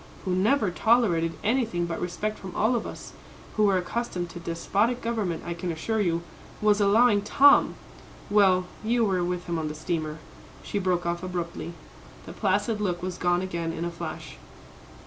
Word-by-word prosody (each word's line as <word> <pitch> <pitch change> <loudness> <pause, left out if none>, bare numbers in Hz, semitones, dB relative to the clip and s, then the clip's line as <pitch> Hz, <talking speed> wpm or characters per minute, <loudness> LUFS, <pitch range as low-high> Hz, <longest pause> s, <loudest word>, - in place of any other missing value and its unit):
who 185 - 0
never 205 +2 +2
tolerated 175 -7 +2
anything 220 -7 +1
but 170 -1 -4
respect 210 +5 -3
from 185 -2 -8
all 225 +4 +2
of 235 - -2
us, - - -9 0.4
who 215 - +3
were 195 -2 +4
accustomed 180 -2 -3
to 175 - -8
despotic 200 +8 0
government, 215 -9 -2
I 170 - -3
can 170 +1 -4
assure 215 +7 -1
you, 170 -3 0 0.4
was 210 0 +3
allowing 205 +1 +5
Tom! 280 +7 +5 0.5
well, 190 -3 +4 0.2
you 230 +1 +2
were 185 -3 +1
with 180 0 -2
him 170 -2 -2
on 155 - -2
the 150 - -5
steamer," 155 -1 -3 0.5
she 205 - -2
broke 180 -2 0
off 170 0 -1
abruptly. 175 -2 -4 0.5
The - - -8
placid 205 +2 0
look 175 -3 -1
was 180 -1 -4
gone 175 0 +2
again 170 -3 -3
in 165 +1 -4
a 170 - -3
flash. 170 - -7
185 Hz, 175 wpm, -26 LUFS, 170-215 Hz, 0.5 s, allowing